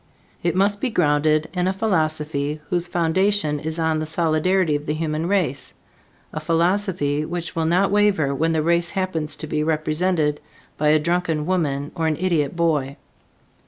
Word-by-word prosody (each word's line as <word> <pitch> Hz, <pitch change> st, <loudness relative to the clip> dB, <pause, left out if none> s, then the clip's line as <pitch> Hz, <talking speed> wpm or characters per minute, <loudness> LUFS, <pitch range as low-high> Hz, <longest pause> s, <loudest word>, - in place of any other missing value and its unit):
It 170 Hz, 0 st, 0 dB
must 200 Hz, +2 st, +2 dB
be 260 Hz, -, 0 dB
grounded 155 Hz, -5 st, +2 dB
in 180 Hz, -1 st, 0 dB
a 190 Hz, -, +1 dB
philosophy 155 Hz, -7 st, -1 dB
whose 175 Hz, -1 st, 0 dB
foundation 175 Hz, -1 st, +1 dB
is 160 Hz, +2 st, -4 dB
on 160 Hz, -1 st, +1 dB
the 155 Hz, -, -3 dB
solidarity 165 Hz, +1 st, +1 dB
of 145 Hz, +1 st, -4 dB
the 150 Hz, -, 0 dB
human 155 Hz, +1 st, -2 dB
race, 160 Hz, -10 st, -1 dB, 0.6 s
a -, -, -3 dB
philosophy 165 Hz, -2 st, 0 dB
which 170 Hz, +1 st, -5 dB
will 165 Hz, -1 st, 0 dB
not 185 Hz, +4 st, +2 dB
waver 200 Hz, -9 st, +2 dB
when 160 Hz, +4 st, +1 dB
the 160 Hz, -1 st, +1 dB
race 170 Hz, +1 st, +1 dB
happens 165 Hz, -6 st, -2 dB
to -, -, -7 dB
be 150 Hz, 0 st, -1 dB
represented 155 Hz, 0 st, 0 dB, 0.3 s
by 150 Hz, -, 0 dB
a 155 Hz, +1 st, +5 dB
drunken 165 Hz, -1 st, 0 dB
woman 150 Hz, -6 st, -1 dB
or 165 Hz, -2 st, -1 dB
an 155 Hz, -2 st, 0 dB
idiot 170 Hz, -5 st, 0 dB
boy. 150 Hz, -5 st, 0 dB
160 Hz, 165 wpm, -22 LUFS, 150-180 Hz, 0.6 s, a